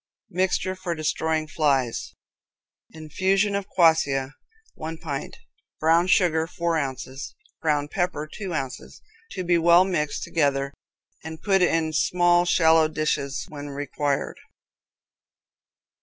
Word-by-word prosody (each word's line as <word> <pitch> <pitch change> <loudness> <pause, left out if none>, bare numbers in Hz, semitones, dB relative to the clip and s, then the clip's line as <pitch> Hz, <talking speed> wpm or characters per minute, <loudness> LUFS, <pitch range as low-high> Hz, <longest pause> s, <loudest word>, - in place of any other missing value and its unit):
Mixture 185 +1 0
for 185 -2 -4
Destroying 155 0 -1
Flies 140 -6 0 0.7
Infusion 190 +6 0
of 200 -1 -2
quassia, 145 -6 +2 0.4
one 160 +1 -6
pint; 150 -4 -5 0.4
brown 165 +3 +3
sugar, 165 -4 +3
four 170 -1 -1
ounces; 135 -2 -4 0.3
ground 150 -2 0
pepper, 175 -5 -1
two 190 +4 -7
ounces. 135 - -5 0.3
To 185 - -4
be 175 -1 +2
well 170 +2 +6
mixed 155 -6 -2
together, 140 -3 0 0.5
and 160 0 -7
put 195 -2 +3
in 165 -2 +1
small, 175 +2 +3
shallow 160 -2 +4
dishes 150 -3 -2
when 145 -1 -8
required. 145 0 -2
160 Hz, 110 wpm, -24 LUFS, 145-175 Hz, 0.7 s, well